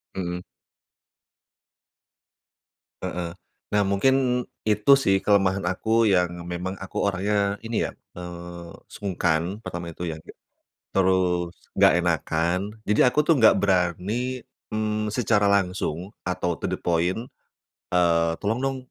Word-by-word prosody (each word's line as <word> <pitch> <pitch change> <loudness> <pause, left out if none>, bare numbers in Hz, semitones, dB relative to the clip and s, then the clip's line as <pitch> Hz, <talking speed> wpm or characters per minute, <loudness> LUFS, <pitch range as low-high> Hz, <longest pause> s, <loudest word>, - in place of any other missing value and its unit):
Mhm. 90 -1 -3 2.6
Heeh, 90 -2 -3 0.4
nah 105 0 +3
mungkin 125 +4 +2 0.2
itu 105 +5 +3
sih 95 -7 +3
kelemahan 100 -2 +3
aku 110 +6 +1
yang 90 -1 +1
memang 90 +2 -4
aku 95 - -5
orangnya 100 +1 0
ini 115 0 -1
ya, - - -8 0.2
eee, 85 -1 -9 0.2
sungkan 95 +1 -1
pertama 85 -5 -5
itu - - -6
ya, 80 - -7 0.7
terus 90 -2 +1 0.2
enggak - - +7
enakan 85 +1 0 0.2
jadi 110 +4 +3
aku 150 - +4
tuh 155 0 +3
enggak 110 -3 +6
berani, 100 +7 0 0.3
mmm, 110 -1 -1
secara 110 -3 +2
langsung 95 -3 0 0.2
atau 90 -2 -1
to - - -5
the - - -2
point, 90 +7 0 0.7
eee, 85 -2 +3
tolong 110 +3 0
dong, 135 +1 -1
95 Hz, 115 wpm, -25 LUFS, 85-105 Hz, 2.6 s, enggak